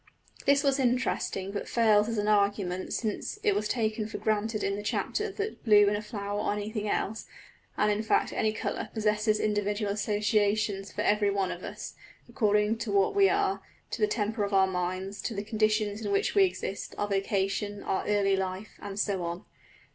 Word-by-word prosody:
This 280 +1 +5
was 275 -1 +2
interesting 245 -6 0
but 200 - -5
fails 215 -2 +4
as 230 - -2
an 205 0 0
argument 200 -3 +1
since 215 -3 -2
it 205 - +3
was 210 +1 -1
taken 220 -2 -1
for 220 - -6
granted 215 0 -1
in 200 - 0
the 205 - -4
chapter 420 - -1
that 420 +2 -4
blue 210 -3 +6
in 205 - +2
a 205 - -2
flower 205 -2 -4
or 205 - 0
anything 210 0 -3
else, 220 +2 -2 0.5
and 210 0 +3
in 210 +1 0
fact 220 - +1
any 220 - +1
colour, 215 0 -3
possesses 215 0 +1
individual 205 0 0
associations 210 -1 0
for 210 - -3
every 210 -1 +3
one 195 -2 0
of - - -7
us, - - -7 0.3
according 210 0 +1
to 230 - -3
what 200 -1 +3
we 395 -1 +5
are, 400 -1 +1 0.3
to - - -4
the 425 - +5
temper 215 - -1
of 200 0 -1
our 190 0 +6
minds, 185 +2 -3
to 230 - -3
the 200 - -3
conditions 215 0 0
in 205 - -2
which 200 - +1
we 395 -1 +6
exist, 200 - -4
our 205 - -1
vocation, 195 +1 -1
our 190 - -1
early 200 -2 +3
life, 190 +2 -4
and 200 0 -6
so 200 -3 0
on. 170 +1 -4
210 Hz, 195 wpm, -29 LUFS, 200-220 Hz, 0.5 s, blue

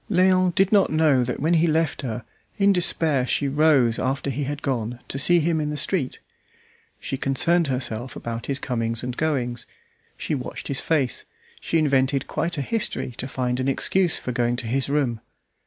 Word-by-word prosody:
Léon 185 -1 +3
did 195 0 +3
not 200 -3 +4
know 155 -5 +3
that 125 - -3
when 160 +4 +1
he 170 0 +4
left 160 -1 0
her 120 -3 -5 0.3
in 200 0 +4
despair 155 -7 +2
she 140 - 0
rose 140 -5 +3
after 135 +2 -1
he 140 +2 -3
had 145 +1 -5
gone 120 -3 -2
to 135 - -3
see 175 +5 +4
him 160 0 +1
in 150 - -2
the 150 - -3
street. 145 -2 0 0.8
She 135 - -4
concerned 165 +6 +2
herself 125 -2 -3
about 115 0 -5
his 140 - -1
comings 115 -4 -2
and 125 0 -4
goings; 125 -7 -2 0.5
she - - -3
watched 130 -4 -5
his 140 - -1
face; 140 -7 0 0.3
she 165 - -1
invented 135 -3 +2
quite 165 +1 -2
a 140 - -1
history 220 - -2
to 130 - -3
find 125 -1 -2
an 130 - -1
excuse 175 +5 +1
for 125 - -4
going 120 0 0
to 120 - -5
his 130 +4 -1
room. 135 -6 0
140 Hz, 190 wpm, -23 LUFS, 125-160 Hz, 0.8 s, not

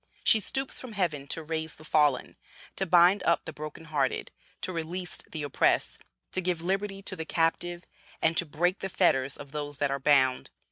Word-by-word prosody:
She 220 - +6
stoops 270 +6 0
from 255 -4 -8
heaven 155 -8 -1
to 160 - -3
raise 160 0 -3
the 155 - -14
fallen, 150 -4 +2 0.4
to 190 - -1
bind 180 +3 +6
up 170 - +2
the 160 - -6
broken 155 +2 -8
hearted, 145 -4 -1 0.3
to 185 - -3
release 175 +2 -4
the 155 -2 -3
oppressed, 145 - +1 0.3
to 185 - -1
give 180 -2 0
liberty 195 +2 -2
to - - -2
the 160 - -4
captive, 170 +2 0 0.3
and 160 +1 +2
to 175 - +3
break 175 +6 0
the 195 - -4
fetters 140 -8 +2
of 140 - -10
those 145 -1 -5
that 145 0 0
are 140 - -1
bound. 130 -2 +3
165 Hz, 190 wpm, -28 LUFS, 150-185 Hz, 0.4 s, She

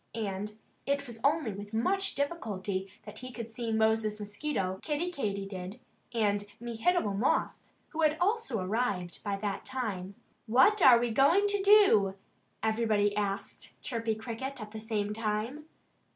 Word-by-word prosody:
And 210 -1 -3 0.3
it 280 0 0
was 235 -3 -8
only 295 -4 +2
with 205 +2 -7
much 390 - +1
difficulty 200 - -3
that 210 0 -9
he 255 0 -7
could 235 -2 -7
see 230 0 -3
Moses 220 -1 +2
Mosquito, 205 -3 -3
Kiddie 320 +3 -1
Katydid, 200 - -4 0.3
and 205 -3 +1 0.2
Mehitable 235 - 0
Moth, 225 +7 0 0.2
who 325 - -3
had 310 0 +3
also 385 - +1
arrived 190 -2 -1
by 200 -1 -1
that 200 0 -3
time. 200 -7 -4 0.3
"What 265 - +5
are 250 -6 +9
we 235 0 0
going 295 - +4
to 405 -1 +1
do?" 390 - +6 0.5
everybody 220 -2 +2
asked 200 -1 -4
Chirpy 230 -3 -1
Cricket 240 +4 -5
at 210 -1 -8
the 220 - -6
same 215 -2 -2
time. 225 +7 -2
225 Hz, 145 wpm, -30 LUFS, 205-275 Hz, 0.5 s, are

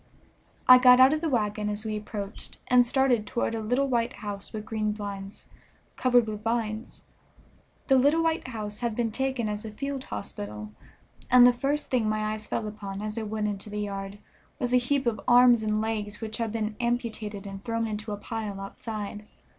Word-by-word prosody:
I 255 0 +10
got 250 0 +7
out 260 +3 +7
of 310 - -1
the 330 - 0
wagon 210 -4 0
as 210 +1 -4
we 215 -1 -2
approached, 210 -1 -6
and 245 -1 +6
started 250 -4 +2
toward 235 - -1
a 225 - -2
little 245 +6 +1
white 240 -2 0
house 205 -2 -7
with 215 -1 -6
green 215 -1 -1
blinds, 200 -1 -6 0.5
covered 245 -2 +4
with 210 -1 -5
vines. 225 0 -3 0.8
The 265 -2 +5
little 295 +5 +3
white 325 -4 0
house 215 -4 -5
had 235 -3 -2
been 230 -1 0
taken 265 -1 -1
as 210 +1 -3
a 220 - -6
field 275 +4 -5
hospital, 105 +1 -6 0.6
and 250 0 +8
the 245 - +7
first 280 +4 -1
thing 235 -4 +2
my 215 0 -1
eyes 215 0 -6
fell 215 - -2
upon 200 -2 -6
as 215 0 -3
I 230 - -2
went 215 0 -2
into 205 0 -4
the 210 0 -3
yard 195 -1 -5 0.4
was 245 0 -2
a - - +7
heap 265 +2 0
of 220 -4 0
arms 245 -1 +7
and 215 0 0
legs 210 -2 -3
which 220 -1 -5
had 230 -2 -1
been 215 -1 -2
amputated 225 -4 -2
and 195 0 -8
thrown 230 -1 -1
into 210 0 -4
a 205 - -3
pile 210 -1 -5
outside. 210 +1 -6
220 Hz, 195 wpm, -27 LUFS, 210-245 Hz, 0.8 s, I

